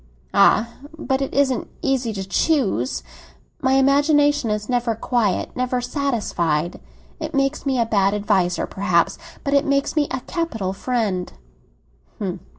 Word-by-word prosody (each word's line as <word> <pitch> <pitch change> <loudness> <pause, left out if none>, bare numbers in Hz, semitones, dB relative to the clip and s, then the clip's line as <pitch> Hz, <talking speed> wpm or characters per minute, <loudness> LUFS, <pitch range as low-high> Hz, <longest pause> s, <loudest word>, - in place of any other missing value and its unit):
"Ah! 225 - +5 0.3
but 265 -3 -1
it 270 - -2
isn't 265 -3 +1 0.2
easy 265 -4 +1
to 195 -2 -5
choose. 265 +1 +1 0.6
My 260 0 +2
imagination 285 -1 +3
is 210 0 -2
never 245 -2 0
quiet, 225 -4 0
never 255 0 0
satisfied. 220 - -1 0.4
It 315 -1 -5
makes 275 +1 0
me 265 -1 +1
a 230 - +3
bad 200 -2 +2
adviser, 200 -4 +1
perhaps; 185 -4 +1 0.2
but 280 - -1
it 280 0 +4
makes 280 0 0
me 295 -2 +2
a 260 - -3
capital 225 - -3
friend!" 205 -5 -1
250 Hz, 135 wpm, -22 LUFS, 205-280 Hz, 0.6 s, Ah